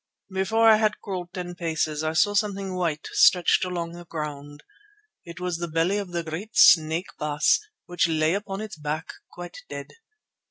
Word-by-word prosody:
Before 220 +4 +2
I 220 -1 +8
had 215 -1 +1
crawled 180 -3 -5
ten 180 -1 -6
paces 160 -3 -2
I 155 0 -1
saw 205 +6 +3
something 200 -2 -1
white 170 -4 -2
stretched 180 0 +4
along 175 -2 -3
the 175 0 -10
ground. 145 -2 -7 0.6
It 170 +1 -10
was 180 -2 -2
the 170 - -3
belly 165 +5 +1
of 195 -3 -6
the 170 -1 -2
great 165 +7 -6
snake, 160 +2 +5
Baas, 150 -1 +2 0.3
which 175 -1 +1
lay 155 0 +2
upon 200 0 -4
its 215 -3 -7
back 155 +1 -4 0.2
quite 175 -1 -9
dead. 140 -1 -7
175 Hz, 170 wpm, -25 LUFS, 155-190 Hz, 0.6 s, I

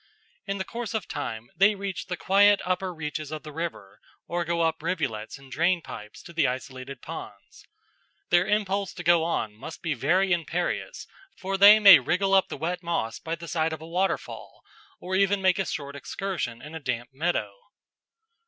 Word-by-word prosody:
In 195 0 -2
the 190 - -2
course 235 -1 -5
of 215 - -2
time 110 +1 -5
they 200 +2 +5
reach 195 -2 -5
the 180 -2 -3
quiet 200 +3 +5
upper 185 +1 -1
reaches 155 -2 -5
of 155 -1 -5
the 155 - -8
river 150 - -6 0.3
or 175 0 -2
go 170 0 -1
up 160 -1 0
rivulets 150 -11 -3
and 135 -1 -16
drainpipes 165 -11 -2
to 170 - -12
the 165 - +2
isolated 130 +1 -6
ponds. - - -10 0.6
Their 175 +1 +4
impulse 200 -2 0
to 175 - -7
go 170 0 +4
on 135 -10 -1
must 115 +9 -10
be 165 - 0
very 180 +9 +2
imperious, 175 - -2 0.3
for 195 0 -3
they 200 +2 +9
may 200 -7 +10
wriggle 180 +9 0
up 190 -1 +5
the - - -5
wet 175 +5 -2
moss 115 -10 -2
by 165 +5 -3
the 170 0 -10
side 160 -1 0
of 160 - -7
a - - -8
waterfall 185 +3 -3 0.4
or 185 +1 -3
even 195 +1 +3
make 190 0 +2
a 195 - 0
short 140 -2 -5
excursion 145 -7 -4
in 150 +2 -9
a 160 - -5
damp 125 -3 -3
meadow. 135 -9 -1
170 Hz, 185 wpm, -26 LUFS, 145-190 Hz, 0.6 s, may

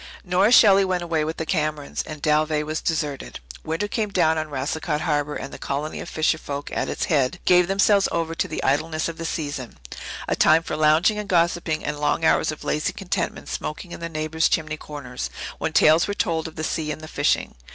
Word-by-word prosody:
Nora 185 +4 +3
Shelley 200 -5 +7
went 185 -2 -1
away 165 -2 0
with 160 +1 -3
the 160 - -3
Camerons, 155 -3 -1
and 155 -2 -8
Dalveigh 155 0 +2
was 155 +1 -3
deserted. 150 -4 -3 0.2
Winter 165 +6 -2
came 215 0 -1
down 170 -5 +2
on 155 0 -4
Racicot 150 +2 -2
Harbour, 150 -2 0
and 135 - -6
the - - -8
colony 145 +3 -3
of - - -7
fisher 160 0 +1
folk 145 -1 -6
at - - -1
its - - -2
head 145 -2 +1
gave 180 -1 +5
themselves 200 +1 +3
over 165 -1 -1
to - - -1
the 155 - -4
idleness 155 +3 0
of 165 -1 -7
the 165 - -4
season 145 -6 -4 0.5
a - - +1
time 160 +1 +5
for - - -4
lounging 155 +7 +3
and 210 -1 -6
gossipping 170 -2 +1
and 145 - -3
long 150 +2 +1
hours - - +3
of 155 - -9
lazy 150 - -1
contentment 185 -2 -3
smoking 170 +4 -5
in - - -7
the 170 0 -5
neighbours' 155 0 0
chimney 155 -1 0
corners, 130 - -6 0.3
when - - -1
tales 160 +2 +5
were 205 - -2
told 165 -4 -1
of 160 - -11
the 155 - -4
sea 155 -1 -2
and 155 - -6
the 155 - -8
fishing. - - 0
160 Hz, 215 wpm, -23 LUFS, 150-170 Hz, 0.5 s, Shelley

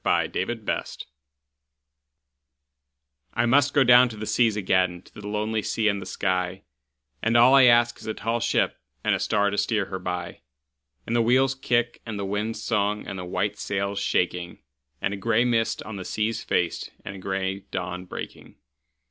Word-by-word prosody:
Y - - +2
Z - - -8
Sea - - 0
Fever 110 -3 -2 2.5
I 120 - +2
MUST 140 +4 +3
down 125 +1 +7
to 110 - -9
the 110 - -5
seas 115 -1 +2
again, 95 -3 +1
to - - -21
the 105 0 -9
lonely 105 +1 -1
sea 110 +1 0
and 100 -1 +1
the - - -8
sky, 90 0 -1 0.6
And 115 +1 +2
all 120 +3 +7
I 135 -2 +8
ask 120 0 +4
is - - -11
a 110 - -2
tall 115 +1 -1
ship - - 0 0.2
and - - +2
a - - 0
star 100 -1 +1
to 100 - -1
steer 105 0 +1
her 95 0 -5
by, 90 -1 -5 0.6
And 115 - -2
the 120 - +4
wheel's 130 +3 +3
kick 120 -2 -1
and 110 -3 -5
the 100 - -3
wind's 105 +3 -3
song 105 -1 0
and 95 - -6
the 90 - -5
white 100 +3 -2
sail's 100 +1 -2
shaking, 90 -2 -1 0.4
And 100 - 0
a - - -4
gray 115 +4 +2
mist 115 -2 0
on 110 -2 -7
the 95 - -5
sea's 110 +4 -2
face, - - -1 0.2
and 95 - -6
a - - -10
gray 95 0 -2
dawn 90 +1 -4
breaking. - - -9
105 Hz, 185 wpm, -25 LUFS, 95-115 Hz, 2.5 s, I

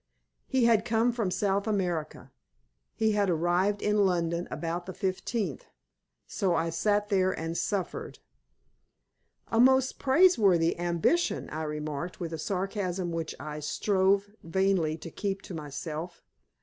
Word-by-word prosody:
He 260 -2 +2
had 225 -2 +4
come 230 +1 +2
from 230 -5 -1
South 200 +2 0
America. 180 -7 -2 0.6
He 220 0 +2
had 205 -2 +1
arrived 175 +5 +1
in 210 0 +2
London 170 -2 0
about 170 +1 -4
the 185 - -5
15th. 195 +3 -2 0.6
So 190 -5 0
I 165 0 0
sat 205 +5 +1
there 190 -2 +3
and 165 +1 -3
suffered. 195 0 -3 1.3
"A 225 - +1
most 260 +1 +4
praiseworthy 225 - +4
ambition," 175 - 0
I 155 - -4
remarked, 150 +2 -4
with 165 -2 -4
a 160 - -4
sarcasm 185 0 -2
which 165 -1 -3
I 150 0 -6
strove 195 +5 +1
vainly 170 -2 +1
to 165 +1 -9
keep 195 +1 -3
to - - -8
myself. 155 +2 -6
185 Hz, 135 wpm, -29 LUFS, 165-205 Hz, 1.3 s, had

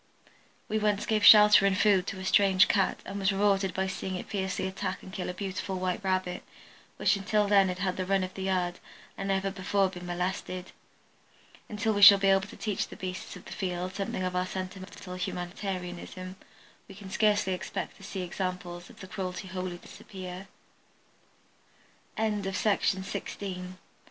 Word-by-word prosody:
We 215 - 0
once 210 -1 +1
gave 215 -2 +1
shelter 210 -1 +9
and 190 -1 +1
food 200 -4 +3
to 195 - -4
a 190 - -6
strange 190 -1 +5
Cat 195 -2 +1
and 200 - -5
was 195 0 +2
rewarded 195 -1 +2
by 190 - 0
seeing 190 0 -4
it 180 - -6
fiercely 190 -2 -2
attack 190 0 -4
and 190 - -11
kill 185 - -3
a - - -3
beautiful 190 0 -4
white 185 +2 -2
Rabbit 185 -1 -1 0.6
which 195 +1 +3
until 210 +1 +1
then 200 -1 +5
had 180 0 -3
had 185 -1 -1
the 185 - -1
run 195 -1 +2
of 185 0 -5
the 190 - -7
yard 180 -2 -1 0.4
and 195 - -4
never 195 0 0
before 195 0 +1
been 180 -1 -9
molested. 180 +1 -3 1.0
Until 215 +1 0
we 205 - -1
shall 200 0 +11
be 195 0 +2
able 195 0 +2
to - - -12
teach 210 -3 -2
the - - -10
beasts 185 -1 -6
of - - -12
the - - -11
field 180 0 -3
something 195 -1 -3
of 185 0 -2
our 180 0 0
sentimental 185 0 -7
humanitarianism 185 0 -5 0.5
we 195 - -12
can 190 -1 -10
scarcely 205 -3 +2
expect 180 - -5
to - - -15
see 195 -1 -5
examples 180 -1 -4
of 190 - -11
cruelty 185 0 -4
wholly 185 -1 -4
disappear. 185 +1 -9 1.7
[Illustration: 205 -2 0
From - - -4 0.2
col. 185 -2 -5
Chi. 185 - -12
190 Hz, 175 wpm, -29 LUFS, 185-200 Hz, 1.7 s, shall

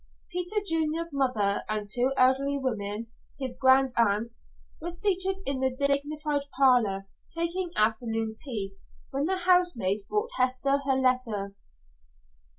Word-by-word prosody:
Peter 360 +3 -3
Junior's 325 -1 -1
mother 245 -8 +1
and 215 -1 -2
two 245 +5 +2
elderly 270 +2 +3
women 220 -5 -3 0.3
his 260 -2 -2
grandaunts 235 -4 +2 0.3
were 340 - -3
seated 380 +1 0
in 275 -1 -1
the 260 -1 0
dignified 285 +1 0
parlor, 235 -8 +3 0.2
taking 340 +2 -2
afternoon 225 0 0
tea, 215 -6 -4 0.4
when 275 +2 -1
the 380 +3 0
housemaid 350 - +2
brought 425 +3 -1
Hester 260 +2 +1
her 270 - +3
letter. 250 -6 0
265 Hz, 120 wpm, -28 LUFS, 225-310 Hz, 0.4 s, elderly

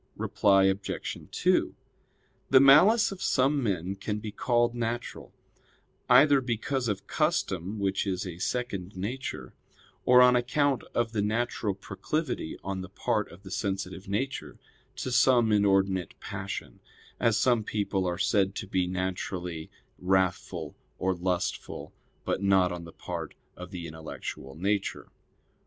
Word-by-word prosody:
Reply 95 -1 +3
Obj. 95 +1 -1
2: - - +1 0.7
The 130 - +7
malice 190 - +7
of 195 -1 -8
some 140 -1 +2
men 95 -4 -1
can 105 +2 -3
be 105 0 -6
called 120 +1 +1
natural, 120 0 -4 0.8
either 140 +2 +7
because 125 +1 -2
of 100 -2 -2
custom 110 - -1
which 100 0 0
is 95 0 -2
a 90 -2 -7
second 100 -5 -3
nature; 120 +8 -5 0.5
or 125 0 +7
on 125 0 +6
account 130 +2 +1
of 120 -1 +1
the 110 -2 0
natural 110 -1 -1
proclivity 130 - -3
on 95 0 -3
the 95 - -8
part 105 +2 -1
of 90 +4 -14
the 95 - -10
sensitive 95 -1 -3
nature 130 +7 -3 0.4
to 130 - -4
some 120 -3 +4
inordinate 95 -3 +2
passion, - - -6 0.4
as 115 -3 +3
some 120 -1 +3
people 100 -3 -1
are 90 -1 -1
said 100 -1 +1
to - - -4
be 95 -2 0
naturally 90 -2 -3 0.3
wrathful 95 -1 0 0.2
or 95 0 +1
lustful; 90 0 -3 0.3
but - - -1
not 95 -2 +4
on 85 -1 -6
the 85 - -10
part - - -6 0.2
of 90 0 -9
the 90 -3 -6
intellectual 80 -4 -7
nature. 100 +4 -2
100 Hz, 140 wpm, -28 LUFS, 95-120 Hz, 0.8 s, The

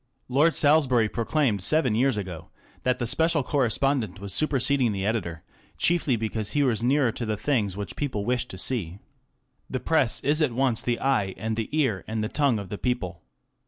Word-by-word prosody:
Lord 150 +6 +3
Salisbury 140 -7 +4
proclaimed 115 -1 0
seven 130 - +2
years 125 +1 +2
ago 90 -5 -6 0.3
that 125 0 +1
the 120 - -2
special 160 +5 +1
correspondent 125 -6 0
was 100 -1 -4
super 150 +1 +1
seding 125 -3 +2
the 95 -1 -3
editor, 90 -7 -2 0.3
chiefly 165 -7 +2
because 110 -1 -3
he 145 - +2
was 120 -5 +1
nearer 130 0 +2
to 120 - -5
the 110 -2 -2
things 105 -8 0
which 100 - -5
people 125 -9 -3
wished 125 +1 0
to 95 - -8
see. 95 -5 -2 0.7
The 130 - -2
Press 135 -5 +1
is 150 +3 +1
at 145 -6 +2
once 125 -2 +1
the 120 -1 -1
eye 120 -9 0
and 110 0 -2
the 110 -1 -3
ear 135 -11 0
and 110 0 -2
the 110 - -2
tongue 140 -6 +2
of 100 -3 -6
the 105 - -5
people. 90 -10 -2
120 Hz, 195 wpm, -26 LUFS, 105-140 Hz, 0.7 s, Salisbury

